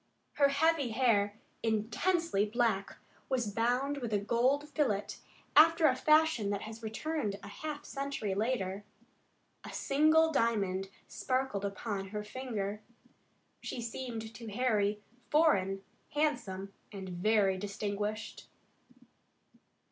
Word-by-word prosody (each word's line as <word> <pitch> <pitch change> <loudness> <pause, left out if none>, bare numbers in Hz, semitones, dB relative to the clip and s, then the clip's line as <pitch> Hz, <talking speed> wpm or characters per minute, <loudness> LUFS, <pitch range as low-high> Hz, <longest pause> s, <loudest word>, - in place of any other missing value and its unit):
Her 280 - +5
heavy 285 -1 +2
hair, 210 -4 +2 0.3
intensely 230 - +1
black, 215 -3 0 0.3
was 240 -6 0
bound 250 +5 +1
with 240 -4 -4
a - - +4
gold 245 +8 +1
fillet, 240 -10 +1 0.5
after 325 +2 +7
a 260 -4 +5
fashion 305 -6 +3
that 200 0 -2
has 220 +1 -8
returned 220 0 -2
a - - -8
half 300 -1 -6
century 275 -8 -3
later. 200 -2 -1 0.8
A - - -8
single 310 +3 +3
diamond 195 -7 +1 0.2
sparkled 255 -6 -1
upon 200 0 -3
her 210 +2 -4
finger. 210 -3 -4 0.8
She - - -5
seemed 230 -1 -5
to 230 +1 -9
Harry 210 -2 +1 0.3
foreign, 195 - +3 0.3
handsome, 230 -11 -1 0.2
and 195 -2 -7
very 190 +1 +2
distinguished. 205 +2 -4
225 Hz, 110 wpm, -32 LUFS, 205-275 Hz, 0.8 s, after